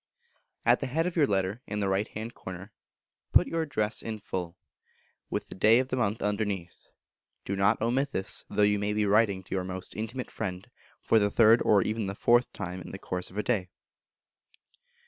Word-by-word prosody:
At - - +5
the - - -3
head 160 +6 0
of 180 - -2
your 150 -5 +4
Letter, 95 +3 -1
in 105 - -3
the 100 - 0
right 95 +2 +1
hand 110 +2 -6
corner, 95 +3 -9 0.6
put - - +7
your 165 - -1
address 110 -8 -1
in 110 -1 -4
full, 90 -3 -5 0.7
with - - -3
the - - -9
day 110 +4 +5
of 130 +1 0
the 130 - -1
month 110 -3 -1
underneath; 100 -4 -3 0.6
do 100 - -2
not 100 0 +3
omit 130 +5 +1
this, 95 -6 -3
though 105 - +2
you 105 0 +3
may 105 +1 -1
be 105 0 +1
writing 100 -2 +3
to - - -8
your 95 -1 0
most 95 0 -6
intimate 115 +4 -5
friend 90 -1 -5 0.3
for 115 - +4
the 100 -1 +2
third 115 +2 +5
or 100 -3 +4
even 110 -1 -2
the 100 - -4
fourth 120 +3 +3
time 90 -2 -6
in - - -9
the - - -7
course 90 -1 -4
of 95 - -12
a 105 - 0
day. 100 -5 0
105 Hz, 205 wpm, -28 LUFS, 95-115 Hz, 0.7 s, put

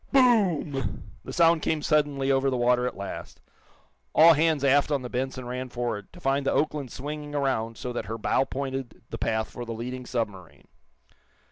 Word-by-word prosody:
Boom! 195 - +2
The - - -7
sound 165 -1 +4
came 155 -1 -1
suddenly 145 -3 +2
over 135 0 +3
the 130 - -1
water, 125 +1 +3
at - - -5
last. 100 0 -7 0.8
All 165 +2 +9
hands 155 -2 +2
aft 140 +1 +4
on 140 -3 0
the 125 - -6
"Benson" 130 0 -3
ran 125 +1 -4
forward, 120 -5 -4
to 175 - -12
find 140 -3 +1
the - - +1
"Oakland" 145 -4 0
swinging 145 +2 -6
around 115 -5 -1
so 125 - -5
that - - -3
her 115 +1 -4
bow 130 +4 +1
pointed 135 -2 -5
the - - -5
path 110 -1 -1
for 120 - -6
the 115 -1 -5
leading 125 +2 -6
submarine. 105 -8 -4
135 Hz, 180 wpm, -27 LUFS, 120-150 Hz, 0.8 s, All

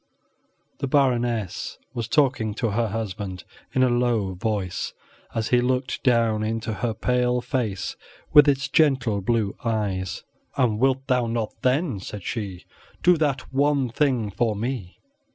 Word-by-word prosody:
The 140 - -1
Baroness 120 -7 0 0.2
was 115 -2 -3
talking 125 -6 +2
to 115 -1 -1
her 115 +2 +1
husband 100 -4 -4 0.3
in 130 - +2
a 130 - +4
low 120 -5 +1
voice, 100 -1 -2 0.4
as 110 -1 -1
he 125 -1 +4
looked 125 +1 -1
down 115 -4 +3
into 110 +1 -2
her 115 0 -2
pale 125 +2 +1
face, 120 -6 -2 0.4
with 150 -1 +8
its 140 -1 +1
gentle 130 -9 +2
blue 105 0 0
eyes. 100 -5 -2 0.3
"And 120 -5 +2
wilt 135 +1 +2
thou 125 -3 +1
not, 115 -1 -2
then," 130 - +1
said 100 0 -7
she, 100 -8 -4 0.4
"do 180 +1 +6
that 140 -4 -1
one 140 -1 +2
thing 120 -5 +1
for 110 +2 0
me?" 110 -4 -4
120 Hz, 145 wpm, -24 LUFS, 105-130 Hz, 0.4 s, with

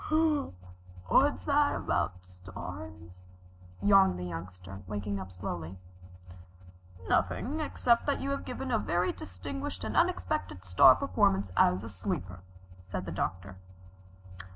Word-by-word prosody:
"What's 285 +2 +4
that 290 0 +3
about 90 - -1
stars?" 90 0 -10 0.6
yawned 95 -2 +5
the 90 - -5
Youngster, 90 +3 -8
waking 100 0 -3
up 95 -1 -8
slowly. 90 -1 -6 1.3
"Nothing 295 +6 0
except 245 -6 +1
that 285 - +1
you 275 - -2
have 275 - -2
given 255 +1 -5
a 225 - +3
very 175 -1 0
distinguished 90 0 -6
and - - -4
unexpected 90 +1 0
star 90 -1 +7
performance 95 0 +1
as 90 +3 +3
a - - -6
sleeper," 90 -1 -4 0.4
said 90 0 -5
the 85 - -5
Doctor. 90 +1 -3
95 Hz, 120 wpm, -30 LUFS, 90-105 Hz, 1.3 s, star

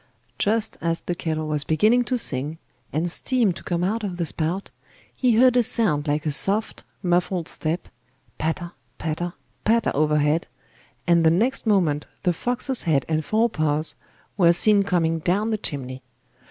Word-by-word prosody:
Just 220 +1 0
as 165 0 -1
the 175 - -3
kettle 155 -2 -3
was 150 -1 -1
beginning 215 +12 +3
to 255 - 0
sing, 150 - -1 0.3
and 165 +4 -1
steam 235 -2 +1
to - - -10
come 175 -1 -1
out 215 +5 -1
of 185 -4 -4
the 170 - -1
spout, 165 +5 -3 0.4
he 250 -3 +2
heard 250 +2 +5
a 245 - +5
sound 210 -11 +1
like 150 +1 0
a 150 - +1
soft, 200 +9 +1 0.2
muffled 175 -1 0
step, 165 +3 -3 0.5
patter, 170 +2 -2 0.3
patter, 165 +2 -3 0.3
patter 230 +1 +2
overhead, 150 +1 +1 0.6
and 170 -1 +4
the 160 - +6
next 230 +9 +1
moment 165 -8 +2 0.2
the 180 -2 +2
fox's 250 +7 -1
head 145 -5 +1
and 155 -1 0
fore 220 +7 +2
paws 155 -6 0 0.4
were 170 -3 +5
seen 205 +3 +4
coming 165 -4 +1
down 195 +7 0
the 215 - 0
chimney. 130 -5 -4
175 Hz, 165 wpm, -23 LUFS, 155-215 Hz, 0.6 s, the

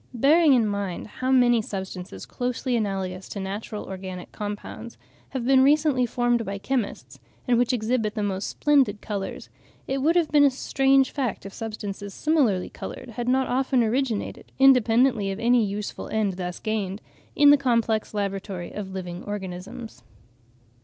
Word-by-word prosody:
Bearing 295 +5 +5
in 240 -4 +4
mind 200 -4 -3
how 255 +4 -4
many 245 -3 +4
substances 190 - -6
closely 250 0 -2
analogous 190 -4 -3
to 200 - -5
natural 205 +2 -5
organic 185 -1 -7
compounds 210 +2 -7 0.3
have 260 -3 -4
been 265 0 +5
recently 285 -2 +3
formed 240 0 +1
by 200 -1 -4
chemists, 200 - -3 0.3
and 240 -1 +3
which 245 +1 +2
exhibit 225 -2 0
the 210 - -1
most 195 -1 -2
splendid 270 -8 +2
colours, 200 -3 -5 0.4
it 270 +1 -1
would 315 +5 +2
have 340 -3 +2
been 295 -2 +6
a 285 - +7
strange 270 0 +2
fact 260 -9 -3
if 195 - -8
substances 205 -2 -6
similarly 265 - +2
coloured - - -8
had 235 +2 -3
not 265 +1 +3
often 260 -1 +1
originated, 235 -1 -2
independently 245 -4 +4
of 195 +1 -4
any 240 0 +4
useful 205 0 -4
end 215 -3 0
thus 180 -1 -5
gained, 210 -3 -2 0.4
in 290 -1 +7
the - - +8
complex 230 -6 0
laboratory 195 -3 -3
of 195 -2 -6
living 180 -1 -5
organisms. 200 - -7
220 Hz, 155 wpm, -25 LUFS, 195-255 Hz, 0.4 s, the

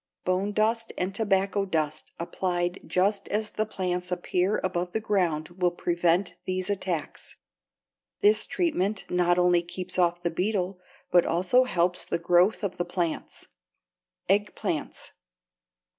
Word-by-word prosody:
Bone 185 +3 +1
dust 225 +2 +1
and 185 +2 -1
tobacco 200 -1 +1
dust 155 -5 -2
applied 175 +1 -2
just 195 +2 +1
as 215 +1 -2
the 215 0 -1
plants 180 -3 -3
appear 180 +2 0
above 180 -1 -2
the 220 - +1
ground 180 -8 0
will 180 0 +1
prevent 175 +1 +1
these 185 +1 -1
attacks. 180 -6 -4 0.9
This 420 +1 +4
treatment 215 - 0
not 175 0 +3
only 180 -1 +4
keeps 180 +1 -5
off 175 0 +2
the 170 - 0
beetle, 185 0 -1 0.3
but 175 -1 +6
also 185 +10 +3
helps 180 -6 +1
the - - -1
growth 175 +5 +3
of 200 - -2
the 175 - 0
plants. 175 -2 -3 0.8
=Eggplants. 205 +1 -1
180 Hz, 130 wpm, -27 LUFS, 175-200 Hz, 0.9 s, but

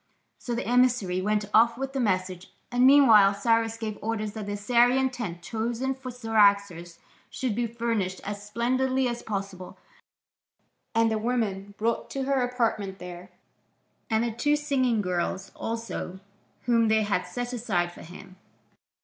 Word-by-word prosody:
So 240 - -4
the 235 - -3
emissary 240 -7 +2
went 210 +1 0
off 230 +1 +5
with 270 +1 -4
the 270 - -2
message, 185 -5 -1 0.2
and 245 +1 +4
meanwhile 225 -8 +7
Cyrus 225 +2 +1
gave 220 -2 -5
orders 215 -1 -3
that 215 -2 -6
the 205 - -3
Assyrian 245 +5 +3
tent 185 -9 -6
chosen 235 +6 -2
for 265 -1 -9
Cyaxares 200 -7 +1 0.3
should 255 -4 -2
be 235 +2 -1
furnished 230 -5 -2
as 205 0 -5
splendidly 255 +4 0
as 240 0 -4
possible, 195 -3 -6 1.2
and 225 0 +3
the 220 - 0
woman 205 -4 -2
brought 230 +1 -1
to 270 - -3
her 270 -1 +1
apartment 225 -6 -1
there, 180 0 -9 0.8
and 220 0 +2
the 235 - -1
two 290 +7 +1
singing 260 -7 0
girls 180 +1 -2
also, 225 -5 -5 0.4
whom 230 -1 +3
they 220 0 +3
had 205 -1 -1
set 245 0 -4
aside 190 -8 -1
for - - -13
him. 185 +2 -12
225 Hz, 150 wpm, -26 LUFS, 200-245 Hz, 1.2 s, meanwhile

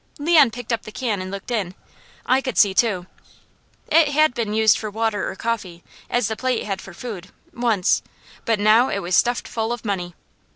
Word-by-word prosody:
Leon 300 -3 +5
picked 240 0 -5
up 230 - -1
the 215 - -10
can 220 -5 -2
and 185 - -6
looked 200 +4 -7
in. 195 -6 -2 0.5
I 260 +1 +3
could 260 -3 -4
see 200 -3 +5
too. 190 -3 +1 0.8
It 325 -1 +5
had 305 -1 +3
been 230 -3 -2
used 220 -2 +4
for 215 - -4
water 220 -1 -1
or - - -7
coffee, 190 -7 -4 0.3
as 245 -3 +1
the 220 - -3
plate 255 0 -1
had 195 -2 -4
for 195 - -11
food, 200 -6 -7 0.3
once, 230 -6 +1 0.4
but 225 -2 0
now 220 +5 +4
it - - -1
was 175 0 0
stuffed 240 +5 +1
full 225 0 -2
of 240 -1 -5
money. 180 -4 -3
220 Hz, 200 wpm, -22 LUFS, 195-245 Hz, 0.8 s, Leon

